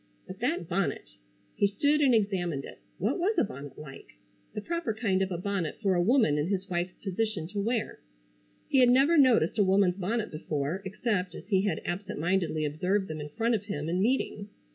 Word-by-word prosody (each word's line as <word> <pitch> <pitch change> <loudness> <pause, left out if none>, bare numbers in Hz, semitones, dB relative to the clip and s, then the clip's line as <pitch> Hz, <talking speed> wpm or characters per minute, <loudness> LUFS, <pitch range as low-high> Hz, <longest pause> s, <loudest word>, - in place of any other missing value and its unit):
But - - -9
that - - -1
bonnet! - - -2 0.4
He 200 - +2
stood 290 +9 +1
and 265 -4 +5
examined 180 -9 0
it. - - -11 0.2
What 220 - -1
was 390 +4 +1
a - - +5
bonnet 140 -6 -8
like? 135 - -11 0.4
The - - -2
proper 335 -4 -2
kind 200 -4 0
of 190 0 -1
a 175 - -2
bonnet 185 -3 -2
for 195 -4 +1
a 175 - +2
woman 200 - +3
in 150 - 0
his 195 0 -2
wife's 175 -1 -2
position 195 -3 -2
to 205 +1 -4
wear. 230 +1 -2 0.7
He 270 - +3
had 250 -1 +6
never 270 +7 +5
noticed 245 - +4
a - - +6
woman's 190 -1 +3
bonnet 215 +4 -2
before 155 +3 -3
except 195 -1 -2
as - - -11
he 195 -1 +2
had - - -2
absent 185 -2 -4
mindedly 165 -2 0
observed 180 +6 -1
them 155 -1 -5
in 150 - -6
front 230 +9 0
of 210 -2 -1
him 155 -7 -4
in 180 +3 0
meeting. 210 -3 0
195 Hz, 205 wpm, -29 LUFS, 175-225 Hz, 0.7 s, had